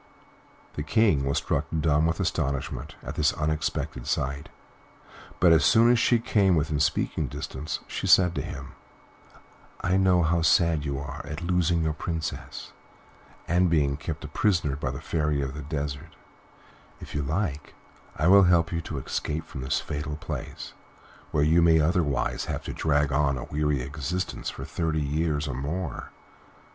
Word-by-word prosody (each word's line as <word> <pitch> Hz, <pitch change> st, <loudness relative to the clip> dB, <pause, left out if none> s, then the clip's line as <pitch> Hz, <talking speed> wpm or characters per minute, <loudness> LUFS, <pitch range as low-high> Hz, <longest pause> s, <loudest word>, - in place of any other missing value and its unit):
The -, -, -4 dB
King 80 Hz, -3 st, +2 dB
was 70 Hz, -, 0 dB
struck -, -, 0 dB
dumb 75 Hz, +1 st, +3 dB
with 80 Hz, -, -1 dB
astonishment 70 Hz, +1 st, -2 dB
at -, -, -5 dB
this 75 Hz, -2 st, +2 dB
unexpected 75 Hz, -4 st, -2 dB
sight; 70 Hz, +2 st, -2 dB, 0.9 s
but 85 Hz, -1 st, +6 dB
as 80 Hz, 0 st, +5 dB
soon 115 Hz, +2 st, +5 dB
as 120 Hz, -, +4 dB
she 120 Hz, -, +4 dB
came 100 Hz, -5 st, +2 dB
within 75 Hz, -1 st, 0 dB
speaking 75 Hz, 0 st, 0 dB
distance, 65 Hz, +4 st, -5 dB
she -, -, -4 dB
said 90 Hz, -2 st, +6 dB
to 75 Hz, -, -2 dB
him, 70 Hz, 0 st, -7 dB, 1.1 s
"I 90 Hz, +2 st, +2 dB
know 95 Hz, -2 st, +4 dB
how 85 Hz, +2 st, +2 dB
sad 80 Hz, -1 st, +3 dB
you 70 Hz, -1 st, -2 dB
are 70 Hz, -1 st, -6 dB
at 75 Hz, +3 st, -5 dB
losing 85 Hz, -1 st, +1 dB
your 80 Hz, -1 st, 0 dB
Princess 80 Hz, +1 st, -5 dB, 0.7 s
and 90 Hz, +1 st, +3 dB
being 70 Hz, -4 st, +2 dB
kept 75 Hz, +1 st, -6 dB
a -, -, -4 dB
prisoner 80 Hz, -3 st, +1 dB
by 70 Hz, -2 st, -3 dB
the 65 Hz, +1 st, -5 dB
Fairy 75 Hz, -2 st, 0 dB
of 65 Hz, -2 st, -2 dB
the 75 Hz, -, -6 dB
Desert; 75 Hz, +1 st, -5 dB, 0.8 s
if -, -, -10 dB
you 75 Hz, -, -1 dB
like 75 Hz, 0 st, -3 dB, 0.4 s
I 75 Hz, -, -1 dB
will 100 Hz, +1 st, +7 dB
help 85 Hz, -2 st, +3 dB
you 85 Hz, -1 st, -1 dB
to 80 Hz, -2 st, -6 dB
escape 75 Hz, +4 st, -3 dB
from 65 Hz, -, -8 dB
this 65 Hz, -, 0 dB
fatal 75 Hz, 0 st, -4 dB
place, 75 Hz, -, -7 dB, 0.6 s
where 75 Hz, -, +1 dB
you 80 Hz, +3 st, +4 dB
may 80 Hz, -1 st, +5 dB
otherwise 75 Hz, -4 st, 0 dB
have -, -, -4 dB
to -, -, -5 dB
drag 75 Hz, -2 st, +1 dB
on 70 Hz, -1 st, +2 dB
a 60 Hz, -, -5 dB
weary 75 Hz, -3 st, -1 dB
existence 80 Hz, +6 st, -3 dB
for -, -, -7 dB
thirty 80 Hz, -2 st, -1 dB
years 75 Hz, +1 st, -1 dB
or 70 Hz, -, -3 dB
more." 75 Hz, +7 st, -4 dB
75 Hz, 165 wpm, -26 LUFS, 70-85 Hz, 1.1 s, will